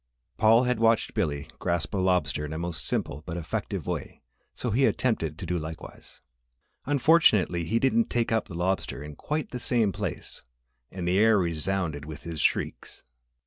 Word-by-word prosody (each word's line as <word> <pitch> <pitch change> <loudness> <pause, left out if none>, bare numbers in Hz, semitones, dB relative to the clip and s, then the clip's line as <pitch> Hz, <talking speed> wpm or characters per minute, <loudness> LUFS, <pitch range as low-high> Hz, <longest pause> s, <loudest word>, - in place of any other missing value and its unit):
Paul 115 +2 +5
had 125 -2 0
watched 115 -1 +3
Billy 75 -8 -1
grasp 85 0 -1
a - - 0
lobster 90 -6 +1
in 75 +1 -5
a - - -4
most 85 -1 -4
simple 75 - -2
but 85 - -4
effective 85 - -3
way - - -5 0.3
so 120 - -2
he 130 +6 +3
attempted 80 -11 0
to - - -6
do 90 -1 -1
likewise. 80 +1 -9 0.7
Unfortunately, 130 - +4
he 110 +8 +1
didn't 220 - +2
take 120 -1 0
up 110 - +1
the 90 - -8
lobster 90 -4 -1
in 75 0 -9
quite 150 - -3
the 125 - -4
same 115 -4 +2
place - - -5 0.5
and 90 -2 -5
the 90 +2 +3
air 110 0 +5
resounded 85 -3 -1
with 75 -1 -9
his 80 -3 -5
shrieks. - - -1
90 Hz, 175 wpm, -27 LUFS, 80-115 Hz, 0.7 s, Paul